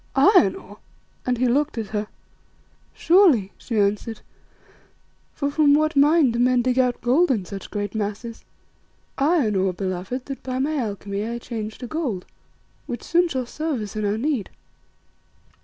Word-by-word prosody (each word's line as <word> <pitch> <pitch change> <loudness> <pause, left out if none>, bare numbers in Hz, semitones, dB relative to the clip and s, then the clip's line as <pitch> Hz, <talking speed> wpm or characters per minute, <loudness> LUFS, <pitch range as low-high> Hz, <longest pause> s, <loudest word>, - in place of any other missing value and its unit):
"Iron 270 - +5
ore?" 205 +2 -12 0.5
and 250 -1 +1
he 255 - +1
looked 285 +3 +1
at 220 -3 -3
her. 210 -1 -2 0.8
"Surely," 325 - +4
she 230 - -4
answered, 205 +3 0 1.1
"for 285 -1 -2
from 290 -1 +4
what 310 +1 +1
mine 290 -1 +5
do 235 - -2
men 250 0 +3
dig 255 +1 +1
out 250 -1 +2
gold 280 +9 +3
in 215 -8 0
such 195 +1 -8
great 205 0 -4
masses? 220 +2 -4 0.8
Iron 280 - +2
ore, 190 -1 +1
beloved, 185 +7 -4
that 275 -1 -7
by 255 -1 -4
my 290 +4 0
alchemy 200 -3 -3
I 235 +2 -3
change 220 -3 -6
to 250 - -7
gold, 245 - -3 0.6
which 240 - -5
soon 350 +1 +2
shall 260 -6 -3
serve 310 +1 -3
us 210 0 -6
in 215 - -2
our 205 +1 0
need." 260 -4 -1
240 Hz, 160 wpm, -23 LUFS, 210-285 Hz, 1.1 s, Iron